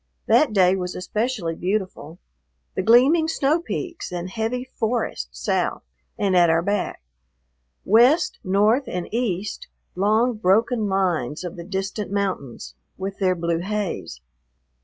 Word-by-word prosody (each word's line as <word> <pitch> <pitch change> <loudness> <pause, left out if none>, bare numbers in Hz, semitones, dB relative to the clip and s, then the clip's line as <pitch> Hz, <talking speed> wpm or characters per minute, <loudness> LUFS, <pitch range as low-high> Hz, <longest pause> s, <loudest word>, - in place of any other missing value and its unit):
That 300 -6 +4
day 190 -2 +4
was 180 -1 -4
especially 210 -2 -2
beautiful. 180 -3 -3 0.6
The - - 0
gleaming 270 +8 +5
snow 315 0 +1
peaks 345 - -5
and 180 +1 -5
heavy 225 +4 -2
forest 225 - -2
south - - -1 0.3
and 195 -2 +1
at 175 -2 +5
our 165 +1 +2
back; 200 - -2 0.8
west, 255 - +4
north, 210 +8 +2
and 180 -1 -4
east, 210 -4 -2 0.3
long, 215 +6 +2
broken 220 +3 +2
lines 180 -8 -1
of 175 0 -6
the 170 - -7
distant 195 +2 -4
mountains 145 - -3 0.2
with 195 +1 -5
their 185 -2 +2
blue 170 -1 -1
haze. 195 - -4
195 Hz, 130 wpm, -23 LUFS, 180-230 Hz, 0.8 s, gleaming